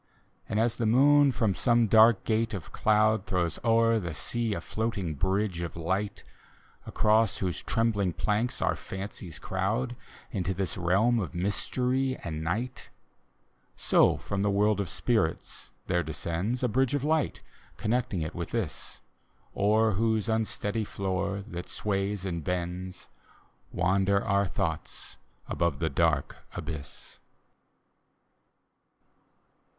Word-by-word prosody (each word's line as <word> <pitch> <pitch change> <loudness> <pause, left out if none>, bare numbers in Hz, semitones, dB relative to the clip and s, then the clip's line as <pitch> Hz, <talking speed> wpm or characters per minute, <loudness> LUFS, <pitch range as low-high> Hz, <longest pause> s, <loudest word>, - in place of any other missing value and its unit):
And 105 - 0
as 115 0 +1
the 115 - 0
moon 140 +4 +6
from 110 -5 +1
some 120 +2 +3
dark 110 0 +6
gate 110 0 0
of 90 - -8
cloud 110 -1 +2
Throws 85 -4 0
o'er 115 0 +4
the 85 -6 -5
sea 115 +2 -1
a - - -3
floating 105 -3 -2
bridge 95 +3 0
of 85 - -5
light. 95 +5 -2 0.6
Across 110 0 +2
whose 90 -3 -2
trembling 110 -5 +1
planks 110 +7 -1
our - - +2
fancies 95 -4 -7
crowd 110 +7 -1 0.4
Into 95 -4 -2
the 95 - -1 0.2
reahn 105 +7 +3
of 85 -6 -5
mystery 125 +8 0
and 80 -2 -4
ntg^t 115 +10 -3 0.5
— - - -41
So - - +3
from 100 -1 -3
the 105 - +2
world 105 +1 +2
of 100 -4 -2
spirits 110 -10 -1 0.2
there 90 -1 +1
descends, 85 - -3
A - - +4
bridge 130 +4 +1
of 140 - -1
light, 155 0 0 0.3
connecting 110 -6 0
it 80 - -5
with 85 -1 -4
this, 110 -11 -4 0.5
O'er 110 +2 +3
whose 110 +2 +1
unsteady 110 -1 -1
floor, 100 0 -2
that 90 -5 -7
sways 100 -1 -2
and 85 -4 -3
bends, 90 +2 -4 0.6
Wander 95 +3 +2
our 100 -2 +2
thoughts 80 -2 -4 0.3
above 85 -4 0
the 80 0 -1
dark - - +1 0.2
abyss. 75 -3 -7
100 Hz, 130 wpm, -28 LUFS, 90-115 Hz, 0.6 s, moon